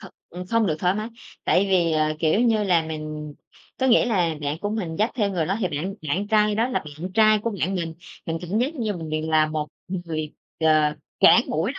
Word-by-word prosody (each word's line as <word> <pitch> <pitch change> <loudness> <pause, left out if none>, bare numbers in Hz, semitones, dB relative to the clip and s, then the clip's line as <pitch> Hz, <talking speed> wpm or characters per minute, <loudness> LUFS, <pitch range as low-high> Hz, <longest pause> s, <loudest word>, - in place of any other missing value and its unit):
thật, - - -10 0.2
ừm, 180 +1 -7
không 230 +1 +2
được 155 - 0
thoải 180 +2 +1
mái, 215 +2 -3 0.4
tại 195 +2 +3
vì, 170 -3 +3
ờ, 155 0 +1
kiểu 165 +7 +2
như 225 -3 +2
là, 175 -4 +3
mình 155 -1 -6 0.5
có 260 - +3
nghĩa 240 - +5
là 175 -8 +1
bạn 145 +2 -2
của 205 - -2
mình 180 -7 -3
dắt 215 +3 +1
theo 205 -5 0
người 170 -5 -1
đó 195 - 0
thì 185 - +1
bạn 165 +7 -3
bạn 195 +7 -1
trai 210 -1 +3
đó 230 +4 +1
là 255 - 0 0.2
bạn 185 +2 -5
trai 215 0 +5
của 230 +2 -2
bạn 190 +4 0
mình. 165 -3 -3 0.3
Mình 165 0 -2
cảm 180 +5 -2
giác 275 +7 0
như 220 -6 -2
mình 160 -2 -6
vì 155 0 -1
là 155 -1 +3
một 155 -1 -3 0.2
người, 165 -4 -4 0.3
ờ, 155 -1 +3 0.3
cản 200 +4 +7
mũi 170 - -1
đó - - -9
180 Hz, 240 wpm, -24 LUFS, 155-210 Hz, 0.5 s, cản